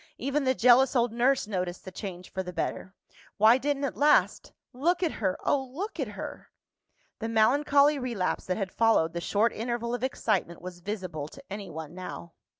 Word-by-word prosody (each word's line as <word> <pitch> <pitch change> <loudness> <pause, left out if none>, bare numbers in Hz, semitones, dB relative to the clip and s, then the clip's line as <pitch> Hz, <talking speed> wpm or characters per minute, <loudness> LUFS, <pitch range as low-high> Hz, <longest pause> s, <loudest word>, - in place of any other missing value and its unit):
Even 275 +3 -1
the 260 0 +2
jealous 250 +3 +5
old 240 -2 +2
nurse 255 +2 +2
noticed 180 -4 -4
the 185 - -7
change 185 -2 -7
for 190 - -2
the 180 -1 -6
better. 185 +1 -4 0.4
Why 220 +5 +6
didn't 285 +1 -1
it 275 - -2
last? 295 +1 +3 0.2
Look 340 +8 +1
at 330 - +1
her 190 -3 0
oh, 275 - +2
look 320 - -6
at - - -1
her!" - - -7 0.7
The 225 - -3
melancholy 280 +6 +4
relapse 235 -8 -2
that 185 - -1
had 195 -3 -3
followed 225 -8 +3
the 170 - -3
short 210 +5 +1
interval 235 +1 -3
of 245 - -3
excitement 215 -9 -1
was 180 0 -9
visible 180 -6 -5
to 275 - -13
anyone 170 -6 -7
now. 175 -2 -8
225 Hz, 180 wpm, -28 LUFS, 185-265 Hz, 0.7 s, Why